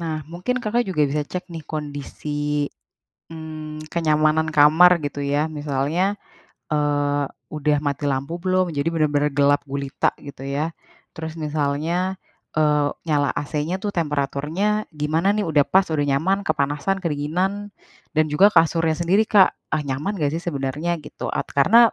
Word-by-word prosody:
Nah, 165 Hz, -2 st, -2 dB, 0.2 s
mungkin 180 Hz, +9 st, -2 dB
Kakak 235 Hz, +3 st, +1 dB
juga 155 Hz, -5 st, +1 dB
bisa 150 Hz, +1 st, 0 dB
cek 180 Hz, 0 st, -5 dB
nih, 165 Hz, -2 st, -6 dB
kondisi, 150 Hz, -1 st, -6 dB, 1.0 s
mmm, 155 Hz, -1 st, -7 dB
kenyamanan 155 Hz, -1 st, +2 dB
kamar, 155 Hz, +4 st, +7 dB
gitu 145 Hz, -, -4 dB
ya. 145 Hz, +2 st, +1 dB
Misalnya, 155 Hz, +6 st, -1 dB, 0.6 s
eee, 145 Hz, -1 st, +1 dB, 0.3 s
udah 150 Hz, 0 st, +2 dB
mati 145 Hz, +1 st, -1 dB
lampu 135 Hz, +4 st, -2 dB
belum, 185 Hz, -2 st, +1 dB
jadi 140 Hz, +3 st, +1 dB
bener-bener 150 Hz, -2 st, +1 dB
gelap 145 Hz, 0 st, +4 dB
gulita, 140 Hz, -1 st, 0 dB, 0.2 s
gitu 140 Hz, -1 st, -9 dB
ya. 145 Hz, +4 st, -2 dB, 0.4 s
Terus 160 Hz, 0 st, -5 dB
misalnya, 155 Hz, +5 st, -1 dB, 0.4 s
eee, 150 Hz, -1 st, +3 dB, 0.2 s
nyala 145 Hz, -2 st, +2 dB
AC-nya 150 Hz, +4 st, -2 dB
tuh 205 Hz, -, -1 dB
temperaturnya 160 Hz, +7 st, -1 dB
gimana 155 Hz, +4 st, 0 dB
nih, 210 Hz, -, 0 dB
udah 150 Hz, -3 st, +4 dB
pas, 190 Hz, 0 st, +6 dB
udah 145 Hz, -, +1 dB
nyaman, 190 Hz, +9 st, +1 dB
kepanasan, 150 Hz, +4 st, 0 dB
kedinginan? 180 Hz, +6 st, -2 dB, 0.4 s
Dan 155 Hz, 0 st, +4 dB
juga 200 Hz, +7 st, +6 dB
kasurnya 165 Hz, -2 st, +3 dB
sendiri, 185 Hz, +5 st, +3 dB
Kak, 195 Hz, -3 st, +7 dB, 0.2 s
ah, 150 Hz, -, 0 dB
nyaman 150 Hz, +10 st, -2 dB
nggak 145 Hz, -2 st, +1 dB
sih, 170 Hz, -, -3 dB
sebenarnya 145 Hz, +1 st, -2 dB
gitu. -, -, -6 dB
At -, -, -2 dB
karena, 200 Hz, +12 st, +5 dB
155 Hz, 145 wpm, -22 LUFS, 145-175 Hz, 1.0 s, kamar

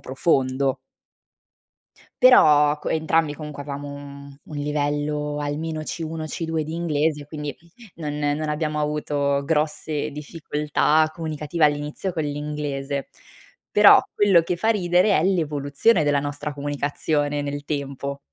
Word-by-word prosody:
profondo. 135 Hz, -1 st, 0 dB, 1.5 s
Però, 150 Hz, -12 st, +6 dB
co -, -, -4 dB
entrambi 160 Hz, -1 st, +1 dB
comunque, 150 Hz, -2 st, -7 dB
avevamo 145 Hz, 0 st, -6 dB
un 140 Hz, 0 st, -8 dB, 0.2 s
mhmm, 140 Hz, -, -14 dB
un 150 Hz, -, -9 dB
livello 150 Hz, 0 st, -1 dB
almeno 155 Hz, +2 st, -3 dB
C1, 160 Hz, 0 st, -5 dB
C2 160 Hz, 0 st, -3 dB
di 160 Hz, +2 st, -6 dB
inglese, 155 Hz, -3 st, 0 dB
quindi, 150 Hz, -2 st, -6 dB, 0.4 s
non 150 Hz, -2 st, -5 dB
non 150 Hz, +1 st, -1 dB
abbiamo 150 Hz, 0 st, -2 dB
avuto 145 Hz, -2 st, 0 dB
grosse 150 Hz, 0 st, -1 dB
difficoltà 150 Hz, +1 st, 0 dB
comunicative 155 Hz, 0 st, -1 dB
all'inizio 150 Hz, +5 st, 0 dB
con 160 Hz, -2 st, -2 dB
l'inglese. 145 Hz, -1 st, -3 dB, 0.6 s
Però, -, -, +8 dB, 0.2 s
quello 195 Hz, -5 st, +5 dB
che 175 Hz, +1 st, -2 dB
fa 220 Hz, -, 0 dB
ridere 185 Hz, -1 st, +3 dB
è 155 Hz, -, +1 dB
l'evoluzione 155 Hz, 0 st, +2 dB
della 145 Hz, -1 st, +2 dB
nostra 145 Hz, +1 st, -4 dB
comunicazione 145 Hz, +1 st, -1 dB
nel 145 Hz, 0 st, -4 dB
tempo. 140 Hz, -1 st, -4 dB
150 Hz, 125 wpm, -23 LUFS, 145-160 Hz, 1.5 s, Però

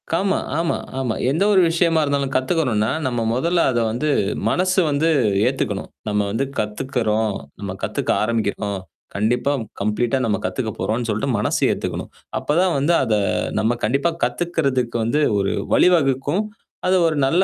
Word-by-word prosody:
ஆமா, 190 Hz, +4 st, +1 dB, 0.2 s
ஆமா, 165 Hz, 0 st, 0 dB, 0.2 s
ஆமா. 120 Hz, -4 st, -1 dB, 0.2 s
எந்த 160 Hz, +7 st, +1 dB
ஒரு 190 Hz, -, +6 dB
விஷயமா 165 Hz, -1 st, +2 dB
இருந்தாலும் 140 Hz, -2 st, -1 dB
கத்துக்கணும்ன்னா, 130 Hz, -6 st, +1 dB, 0.2 s
நம்ம 120 Hz, -2 st, -1 dB
முதல்ல 170 Hz, +8 st, +1 dB
அத 120 Hz, -, 0 dB
வந்து, 125 Hz, +7 st, -1 dB, 0.4 s
மனசு 185 Hz, -, +2 dB
வந்து 150 Hz, +3 st, +1 dB, 0.4 s
ஏத்துக்கணும். 115 Hz, -6 st, -2 dB, 0.2 s
நம்ம 105 Hz, 0 st, 0 dB
வந்து 115 Hz, +6 st, 0 dB
கத்துக்கிறோம், 110 Hz, -1 st, -1 dB, 0.3 s
நம்ம 100 Hz, -2 st, -4 dB
கத்துக்க -, -, -1 dB
ஆரம்பிக்கிறோம், 105 Hz, -3 st, -1 dB, 0.4 s
கண்டிப்பா 120 Hz, +7 st, +1 dB, 0.3 s
கம்ப்ளீட்டா 110 Hz, +5 st, 0 dB
நம்ம 105 Hz, -2 st, +1 dB
கத்துக்கப்போறோம்ன்னு 115 Hz, +1 st, -2 dB
சொல்ட்டு 110 Hz, +5 st, -1 dB
மனசு 105 Hz, -, 0 dB
ஏத்துக்கணும். -, -, -4 dB, 0.3 s
அப்பதான் 175 Hz, +3 st, +1 dB
வந்து 145 Hz, +5 st, +2 dB
அத 115 Hz, -4 st, 0 dB, 0.5 s
நம்ம 110 Hz, +3 st, +1 dB
கண்டிப்பா 140 Hz, +9 st, +1 dB
கத்துக்கிறதுக்கு 140 Hz, -9 st, 0 dB
வந்து 120 Hz, +7 st, +1 dB, 0.2 s
ஒரு 100 Hz, 0 st, 0 dB, 0.2 s
வழி -, -, +6 dB
வகுக்கும். 140 Hz, +5 st, +1 dB, 0.4 s
அது 185 Hz, -, +4 dB
ஒரு 155 Hz, -2 st, -1 dB
நல்ல 170 Hz, +7 st, +3 dB
130 Hz, 140 wpm, -21 LUFS, 110-160 Hz, 0.5 s, ஒரு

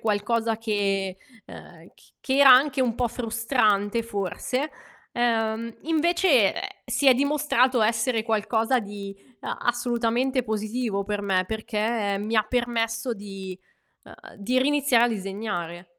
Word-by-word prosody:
qualcosa 225 Hz, +1 st, 0 dB
che 195 Hz, -4 st, -1 dB, 0.3 s
ehm, -, -, -13 dB
c -, -, -24 dB
che 265 Hz, -, -1 dB
era 275 Hz, -1 st, +8 dB
anche 265 Hz, +1 st, +5 dB
un 235 Hz, -3 st, 0 dB
po' 245 Hz, 0 st, 0 dB
frustrante 230 Hz, -2 st, 0 dB
forse, 230 Hz, -, -3 dB, 0.4 s
ehm, 230 Hz, -1 st, -1 dB
invece, 325 Hz, -, +3 dB
ehm, -, -, -4 dB, 0.2 s
si 280 Hz, -, -1 dB
è 260 Hz, -, +7 dB
dimostrato 270 Hz, -3 st, +2 dB
essere 225 Hz, +1 st, +1 dB
qualcosa 225 Hz, +3 st, +1 dB
di 200 Hz, -1 st, -8 dB, 0.3 s
a -, -, -3 dB
assolutamente 240 Hz, +2 st, 0 dB
positivo 215 Hz, -1 st, -2 dB
per 205 Hz, 0 st, -3 dB
me, 190 Hz, -2 st, +1 dB
perché 215 Hz, -1 st, -2 dB
mi 215 Hz, +3 st, -2 dB
permesso 235 Hz, -1 st, -1 dB
di 195 Hz, -2 st, -8 dB, 0.5 s
uhm, -, -, -15 dB
di 240 Hz, +6 st, 0 dB
riiniziare 275 Hz, -4 st, +3 dB
a -, -, +2 dB
disegnare. 190 Hz, -5 st, -5 dB
225 Hz, 130 wpm, -25 LUFS, 205-250 Hz, 0.5 s, era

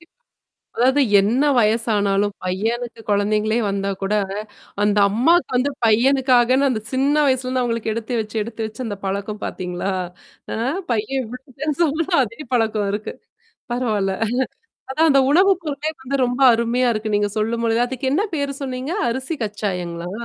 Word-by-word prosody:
கண்டிப்பா. 340 Hz, -, -21 dB, 0.7 s
அதாவது 260 Hz, +4 st, +4 dB, 0.2 s
என்ன 230 Hz, +8 st, +1 dB, 0.2 s
வயசானாலும், 205 Hz, -3 st, +1 dB
பையனுக்கு 225 Hz, +6 st, -2 dB
குழந்தைங்களே 210 Hz, +2 st, +1 dB
வந்தா 195 Hz, 0 st, -2 dB
கூட, 195 Hz, -, 0 dB, 0.7 s
அந்த 205 Hz, 0 st, +2 dB
அம்மாக்கு 300 Hz, -, +3 dB
வந்து, 260 Hz, +3 st, +1 dB
பையனுக்காகன்னு 255 Hz, +3 st, +4 dB
அந்த 225 Hz, -4 st, -1 dB
சின்ன 275 Hz, +3 st, +2 dB
வயசுலருந்து 255 Hz, -1 st, 0 dB
அவங்களுக்கு 230 Hz, -2 st, -1 dB
எடுத்து 230 Hz, +1 st, -2 dB
வச்சு, 215 Hz, 0 st, -9 dB
எடுத்து 225 Hz, 0 st, -5 dB
வச்சு 220 Hz, +4 st, -7 dB
அந்த 205 Hz, -2 st, -4 dB
பழக்கம் 200 Hz, +2 st, -3 dB
பார்த்தீங்களா? 180 Hz, +1 st, -3 dB, 0.6 s
அ -, -, -2 dB, 0.4 s
பையன் 235 Hz, +4 st, 0 dB
இவ்ளோ 250 Hz, +3 st, -9 dB, 0.2 s
பெருசானாலும் 310 Hz, +3 st, 0 dB
அதே 230 Hz, +2 st, -8 dB, 0.2 s
பழக்கம் 220 Hz, -3 st, +1 dB
இருக்கு. 210 Hz, +1 st, -4 dB, 0.6 s
பரவால்ல. 215 Hz, -6 st, 0 dB, 0.8 s
அதான் 320 Hz, +4 st, +3 dB
அந்த 275 Hz, -1 st, +5 dB
உணவு 375 Hz, +6 st, +5 dB
பொருளே 300 Hz, -1 st, -3 dB
வந்து 270 Hz, +2 st, -2 dB
ரொம்ப 245 Hz, +2 st, -2 dB
அருமையா 235 Hz, +2 st, +1 dB
இருக்கு 215 Hz, 0 st, -3 dB
நீங்க 205 Hz, 0 st, +1 dB
சொல்லும்பொழுது. 230 Hz, +1 st, 0 dB
அதுக்கு 260 Hz, +1 st, -3 dB
என்ன 335 Hz, +8 st, +2 dB
பேரு 280 Hz, -1 st, -1 dB
சொன்னீங்க? 260 Hz, +3 st, -4 dB, 0.2 s
அரிசி 260 Hz, +6 st, -2 dB
கச்சாயங்களா? 180 Hz, -5 st, -4 dB
235 Hz, 140 wpm, -21 LUFS, 210-265 Hz, 0.8 s, அந்த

